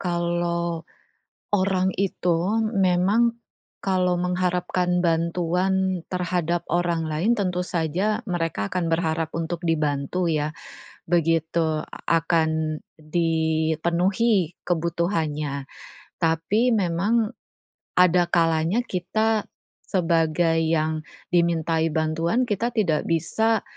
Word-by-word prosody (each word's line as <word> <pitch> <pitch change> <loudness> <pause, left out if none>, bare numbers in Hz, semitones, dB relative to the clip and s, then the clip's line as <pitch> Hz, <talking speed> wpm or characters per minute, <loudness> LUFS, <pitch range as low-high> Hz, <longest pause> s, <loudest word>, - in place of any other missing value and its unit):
kalau 170 -1 -1 0.7
orang 190 -2 +2
itu 190 +2 +1
memang, 200 +4 +2 0.5
kalau 185 -2 +1
mengharapkan 180 0 0
bantuan 180 +2 +1
terhadap 175 -2 -1
orang 170 0 +1
lain 165 +10 +1
tentu 180 -3 0
saja 180 +6 0
mereka 165 - -2
akan 180 -2 -1
berharap 165 -1 0
untuk 165 +1 -3
dibantu 150 +2 0
ya, 150 -1 0 0.6
begitu 165 -1 +1
a - - -14 0.3
akan 160 -2 0 0.2
dipenuhi 165 +4 +1
kebutuhannya, 160 -5 -1 0.5
tapi 165 +8 +2
memang 210 +3 +1 0.7
ada 180 0 +5
kalanya 165 +5 +2
kita 215 +4 0 0.4
sebagai 165 -2 +1
yang 160 -1 0 0.3
dimintai 165 -1 +2
bantuan, 165 +8 0
kita 225 +2 -1
tidak 165 -9 +1
bisa 220 +7 +1
170 Hz, 90 wpm, -24 LUFS, 160-185 Hz, 0.7 s, ada